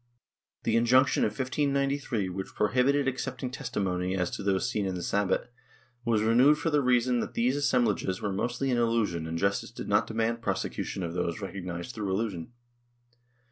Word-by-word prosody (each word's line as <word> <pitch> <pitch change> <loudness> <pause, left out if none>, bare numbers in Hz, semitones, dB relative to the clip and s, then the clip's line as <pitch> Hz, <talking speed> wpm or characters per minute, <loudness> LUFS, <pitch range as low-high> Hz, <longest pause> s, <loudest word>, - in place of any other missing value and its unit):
The 115 - +1
injunction 125 +4 +4
of - - +3
1593, 140 -4 0
which 95 +1 -6
prohibited 130 +6 +2
accepting 130 -1 -3
testimony 95 -6 -2
as 90 -1 -1
to - - -5
those 100 +2 +1
seen 105 -5 -1
in 95 - -2
the 90 - -4
Sabbat, 100 +3 0 0.5
was 110 -2 +2
renewed 125 +7 +5
for 165 - -1
the 150 -1 +3
reason 125 -1 +2
that - - -4
these 125 +3 +2
assemblages 120 -9 +1
were 100 -2 -2
mostly 120 +6 -1
an 120 - +2
illusion 110 -9 0
and 80 +1 -3
justice 100 +3 0
did - - -8
not - - +2
demand 115 +1 -1
prosecution 95 - -3
of 85 -1 -3
those 90 +1 -2
recognized 95 +1 -5
through 105 -3 -3
illusion. 95 -2 -2
115 Hz, 170 wpm, -28 LUFS, 95-125 Hz, 0.5 s, renewed